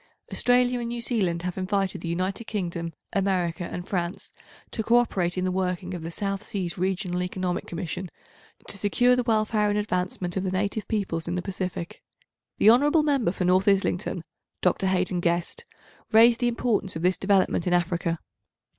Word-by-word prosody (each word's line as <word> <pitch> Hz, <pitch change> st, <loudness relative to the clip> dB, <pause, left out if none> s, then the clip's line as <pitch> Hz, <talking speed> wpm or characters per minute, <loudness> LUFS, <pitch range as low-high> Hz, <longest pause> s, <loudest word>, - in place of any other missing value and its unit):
Australia 245 Hz, 0 st, +3 dB
and 235 Hz, -, -3 dB
New 240 Hz, 0 st, -3 dB
Zealand 195 Hz, -8 st, 0 dB
have 180 Hz, +1 st, -3 dB
invited 195 Hz, 0 st, -1 dB
the -, -, -5 dB
United 185 Hz, +6 st, -2 dB
Kingdom, 170 Hz, -6 st, -3 dB, 0.2 s
America 185 Hz, -3 st, 0 dB
and 175 Hz, +1 st, -6 dB
France 175 Hz, -1 st, -3 dB, 0.4 s
to 225 Hz, -, -2 dB
co 230 Hz, +2 st, +4 dB
operate 185 Hz, -7 st, +1 dB
in 185 Hz, -, 0 dB
the 185 Hz, -, 0 dB
working 180 Hz, -1 st, -2 dB
of 175 Hz, -, -5 dB
the 165 Hz, -, -5 dB
South 195 Hz, +3 st, -3 dB
Seas 185 Hz, -6 st, -3 dB
Regional 180 Hz, -1 st, -1 dB
Economic 180 Hz, 0 st, -2 dB
Commission 175 Hz, +1 st, -4 dB, 0.6 s
to 200 Hz, -, -3 dB
secure 245 Hz, +5 st, +3 dB
the 250 Hz, -, +1 dB
welfare 215 Hz, -2 st, +1 dB
and 205 Hz, -, +1 dB
advancement 180 Hz, -3 st, -2 dB
of 190 Hz, -, 0 dB
the 190 Hz, -, -1 dB
native 200 Hz, +3 st, -1 dB
peoples 185 Hz, -7 st, -2 dB
in 175 Hz, -, -1 dB
the 180 Hz, -, -1 dB
Pacific. 185 Hz, -2 st, -4 dB, 0.6 s
The 215 Hz, -, +7 dB
hon. 295 Hz, +5 st, +4 dB
Member 275 Hz, -, +2 dB
for 185 Hz, -, -2 dB
North 185 Hz, +2 st, +3 dB
Islington 195 Hz, -3 st, +1 dB, 0.4 s
(Dr. 185 Hz, +1 st, +2 dB
Haden 185 Hz, -1 st, +1 dB
Guest) 175 Hz, -, -1 dB, 0.5 s
raised 230 Hz, +2 st, +6 dB
the 245 Hz, -, +2 dB
importance 230 Hz, -6 st, 0 dB
of 160 Hz, -, -4 dB
this 180 Hz, +1 st, +2 dB
development 190 Hz, -3 st, +2 dB
in 180 Hz, -, +2 dB
Africa. 170 Hz, -1 st, 0 dB
185 Hz, 175 wpm, -26 LUFS, 180-215 Hz, 0.6 s, The